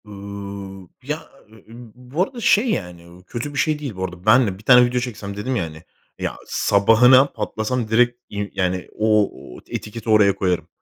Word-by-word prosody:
Iıı, 100 -2 -8 0.2
ya, 150 +4 -5 0.2
e - - -17
e - - -16
ı 110 - -18 0.2
bu 125 +8 -2
arada 240 +5 -7
şey, 225 +3 +3
yani, 90 -5 -5
ı - - -19
kötü 125 +8 -5
bir 145 - -2
şey 155 0 +1
değil. 140 -8 -6
Bu 95 - -4
arada 90 -1 -7
ben 120 +3 +5
de 95 -2 -4
bir 105 - -16
tane 125 +1 +7
video 125 +1 -1
çeksem 105 -5 -6
dedim 125 +5 -2
ya, 95 - 0
hani, 80 0 -9 0.4
ya, - - -3
sabahına 115 +6 +5
patlasam 120 -3 -3
direkt, 120 +2 +2
iii, 100 0 -5
yani, 90 -1 -1
o 105 -1 +3 0.3
o - - -11
etiketi 110 +1 -6
oraya 105 -3 +5
koyarım. 90 -2 -1
110 Hz, 200 wpm, -21 LUFS, 100-125 Hz, 0.4 s, tane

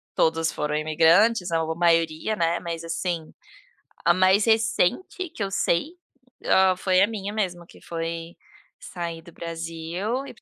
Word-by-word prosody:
todos 165 0 +2
foram 150 0 -2
imigrantes 165 +7 +3
ou 160 0 0
maioria, 165 +3 +1
né, 170 -1 0
mas, 165 -1 -5
assim, 165 -1 -3 0.7
a 170 - +6
mais 185 +3 +4
recente 230 - +1
que 220 - -3
eu 195 - -2
sei, 190 - 0 0.5
ah, 190 -1 +4
foi 185 0 +2
a 200 - +5
minha 205 -2 -5
mesmo 180 -5 -2
que - - -18
foi 165 0 -5 0.4
sair 170 -2 -6
do 170 +1 -15
Brasil 170 +9 -4
e - - -8
ir - - -14
para - - -24
170 Hz, 155 wpm, -24 LUFS, 165-200 Hz, 0.7 s, a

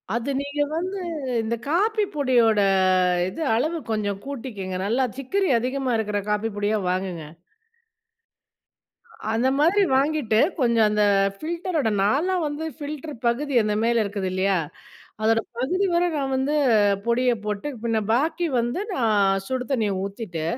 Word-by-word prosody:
அது 235 +3 -2
நீங்க 285 +1 -3
வந்து, 370 +4 -3 0.4
இந்த 225 +1 -2
காப்பி 420 +8 +2
பொடியோட 240 -6 +3 0.7
இது 190 - -7
அளவு 310 +9 0
கொஞ்சம் 205 -2 -1
கூட்டிக்கங்க. 225 -9 -5
நல்லா 240 +5 +1
சிக்கரி 380 +9 0
அதிகமா 255 +1 -1
இருக்கிற 210 -2 -1
காப்பி 210 +2 0
பொடியா 205 +1 0
வாங்குங்க. 180 -3 -3 2.1
அந்த 230 +3 +1
மாதிரி 345 +7 +4
வாங்கிட்டு, 275 -5 +1 0.2
கொஞ்சம் 235 -4 +3
அந்த 210 0 +2 0.3
ஃபில்டரோட 330 - -2
நாலாம் 320 - +1
வந்து 295 +2 -4
ஃபில்டர் 300 +1 -6
பகுதி 270 +5 0
அந்த 210 0 0
மேல 235 0 +2
இருக்குது 200 -2 -3
இல்லையா? 190 +1 +1 0.7
அதோடய 225 +1 +2
பகுதி 365 +11 +1
வர 345 +1 +3
நான் 270 -2 -1
வந்து 270 +3 0 0.5
பொடியை 245 +1 +2
போட்டு, 210 +5 -3 0.2
பின்ன 225 -1 +1
பாக்கி 320 +7 +1
வந்து, 240 +11 -2
நான் 200 -5 +2
சுடு 255 +1 -3
தண்ணீய 220 -6 +1
ஊத்திட்டு, 195 -5 -5
240 Hz, 130 wpm, -24 LUFS, 210-295 Hz, 2.1 s, மாதிரி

